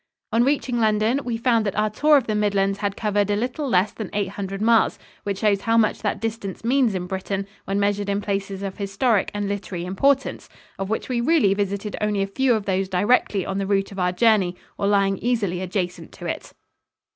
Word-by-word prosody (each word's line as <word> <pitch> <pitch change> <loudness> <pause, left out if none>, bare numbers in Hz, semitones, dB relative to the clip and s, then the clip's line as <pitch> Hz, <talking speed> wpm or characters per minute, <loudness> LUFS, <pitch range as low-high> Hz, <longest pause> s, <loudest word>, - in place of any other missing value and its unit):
On 230 +2 +3
reaching 260 -3 0
London, 220 +3 +2
we 235 -2 -2
found 230 -1 +2
that 200 -3 -2
our 215 0 +1
tour 295 +7 +5
of 265 - 0
the 215 - -1
Midlands 200 -1 +1
had 200 -1 -2
covered 205 -2 0
a 205 - +2
little 255 +6 -2
less 190 -1 +3
than 215 -4 -6
eight 200 -2 0
hundred 195 0 -5
miles, 225 +1 +3 0.2
which 200 -1 -3
shows 200 -2 +2
how 230 +2 +2
much 220 -2 +2
that 210 -1 -1
distance 220 -4 -4
means 245 -4 +2
in 180 -1 -2
Britain 190 +1 -3 0.2
when 195 +1 -1
measured 205 0 0
in 200 0 +1
places 195 -1 -3
of 195 -1 -5
historic 200 +2 +1
and 205 -1 -1
literary 195 -3 -4
importance, 270 +9 0 0.3
of 195 0 -3
which 220 - -2
we 245 -2 -1
really 255 -7 +3
visited 200 +1 -2
only 210 -2 +1
a - - 0
few 245 +5 +1
of 215 -2 -3
those 190 -1 0
directly 200 0 +2
on 195 0 -2
the 195 - -2
route 195 0 +1
of 195 - -7
our 180 0 +2
journey 190 -2 +3 0.2
or 200 - -1
lying 195 -1 +2
easily 205 -7 0
adjacent 180 -1 -3
to - - -10
it. - - -4
205 Hz, 215 wpm, -23 LUFS, 195-225 Hz, 0.3 s, tour